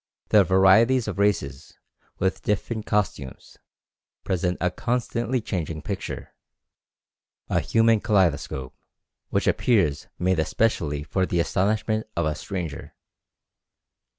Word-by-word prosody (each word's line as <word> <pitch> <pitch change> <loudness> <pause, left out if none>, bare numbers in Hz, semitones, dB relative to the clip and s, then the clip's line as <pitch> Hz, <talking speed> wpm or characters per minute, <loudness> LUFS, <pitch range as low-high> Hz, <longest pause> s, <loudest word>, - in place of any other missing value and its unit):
The 105 -2 +6
varieties 110 +7 +4
of 100 -2 -4
races, 75 -9 -1 0.4
with 95 0 -1
different 105 +1 -2
costumes, 90 -11 -3 0.6
present 90 -1 -1
a 90 +1 0
constantly 120 +1 -1
changing 80 -6 -4
picture, - - -5 1.2
a - - +3
human 115 -1 +3
kaleidoscope, 85 - 0 0.6
which - - 0
appears 85 - +1
made 90 -1 +1
especially 80 -5 0
for 95 +5 -1
the 85 - 0
astonishment 110 +5 0
of 85 - +1
a 75 - 0
stranger. 85 -2 -6
95 Hz, 105 wpm, -24 LUFS, 80-110 Hz, 1.2 s, The